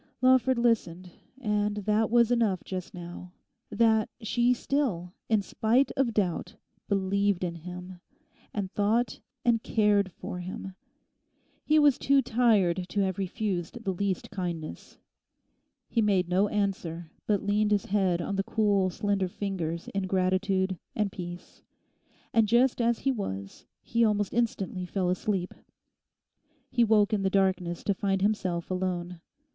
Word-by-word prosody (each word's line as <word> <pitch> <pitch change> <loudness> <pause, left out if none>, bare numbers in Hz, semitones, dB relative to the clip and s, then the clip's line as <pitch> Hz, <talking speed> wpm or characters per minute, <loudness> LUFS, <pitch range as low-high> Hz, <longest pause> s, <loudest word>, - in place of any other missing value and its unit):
Lawford 255 0 +4
listened; 185 -7 0 0.3
and 210 -3 0
that 210 +1 +1
was 235 0 +4
enough 220 -7 +1
just 185 -2 -5
now—that 180 +5 -2
she 240 +2 +1
still, 235 -9 -1 0.2
in 215 -3 +3
spite 235 +7 +2
of 265 -3 +1
doubt, 185 -5 -1 0.3
believed 200 -1 +1
in 175 -2 -1
him, 180 +2 -9 0.5
and 195 -3 -3
thought 215 +3 +1 0.3
and 235 -2 +3
cared 205 -4 +2
for 180 - -6
him. 185 +1 -6 0.9
He 310 - +3
was 295 -3 +5
too 275 0 +3
tired 200 -7 +2
to 205 - 0
have 190 -1 -1
refused 195 +2 -3
the 195 - 0
least 195 +2 -2
kindness. 175 -5 -5 0.9
He 230 - +1
made 195 -4 +2
no 185 +3 +2
answer, 180 -5 -2 0.2
but 205 -2 +1
leant 210 +1 +2
his 205 -2 +1
head 185 -4 +1
on 200 +1 -3
the 195 - +1
cool, 200 -3 +2
slender 200 0 0
fingers 175 -4 -4
in 195 -1 -2
gratitude 190 0 +1 0.2
and 210 -2 0
peace. 175 -1 -8 0.7
And, 225 -2 +4
just 240 +3 +3
as 235 0 +2
he 270 - +2
was, 100 - -5 0.2
he 230 0 +1
almost 205 -3 +1
instantly 195 -6 -1
fell 180 -1 0
asleep. 185 -1 -1 1.2
He 240 -1 +3
woke 215 -1 +3
in 205 - +1
the 190 - +1
darkness 185 -3 0
to 200 - +1
find 195 0 -1
himself 185 -5 -1
alone. 180 -2 -3
200 Hz, 140 wpm, -28 LUFS, 180-220 Hz, 1.2 s, was